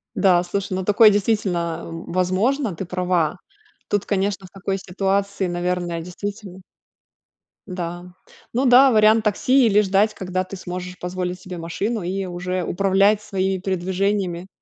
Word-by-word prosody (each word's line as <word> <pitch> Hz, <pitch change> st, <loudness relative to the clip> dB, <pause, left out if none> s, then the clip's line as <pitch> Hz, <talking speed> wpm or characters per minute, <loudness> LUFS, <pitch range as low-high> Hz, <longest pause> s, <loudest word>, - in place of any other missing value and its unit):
Да, 180 Hz, -3 st, +4 dB
слушай, 190 Hz, +1 st, -3 dB
ну, 190 Hz, -, -2 dB
такое 210 Hz, +3 st, +6 dB
действительно, 190 Hz, -5 st, 0 dB
а, -, -, -8 dB
возможно, 185 Hz, -, -1 dB
ты 190 Hz, -, -5 dB
права. 180 Hz, -2 st, 0 dB, 0.5 s
Тут 205 Hz, -1 st, 0 dB
конечно 195 Hz, -1 st, -1 dB
в -, -, -13 dB
такой 195 Hz, +1 st, -3 dB
ситуации, 195 Hz, +1 st, -1 dB
наверное, 175 Hz, -1 st, -2 dB
действительно 190 Hz, +2 st, -7 dB, 1.1 s
Да. 175 Hz, -1 st, -6 dB, 0.4 s
Ну 260 Hz, +3 st, +1 dB
да, 255 Hz, +2 st, +7 dB
вариант 220 Hz, 0 st, +5 dB
такси 250 Hz, +5 st, +3 dB
или 210 Hz, 0 st, +4 dB
ждать, 200 Hz, +2 st, +2 dB
когда 185 Hz, 0 st, -2 dB
ты 185 Hz, -, -9 dB
сможешь 180 Hz, 0 st, -6 dB
позволить 180 Hz, 0 st, -4 dB
себе 180 Hz, -1 st, -8 dB
машину 200 Hz, +7 st, -3 dB
и 190 Hz, +2 st, -3 dB
уже 180 Hz, 0 st, -3 dB
управлять 195 Hz, +4 st, +2 dB
своими 190 Hz, -2 st, -1 dB
передвижениями 190 Hz, -1 st, -1 dB
190 Hz, 140 wpm, -22 LUFS, 180-205 Hz, 1.1 s, да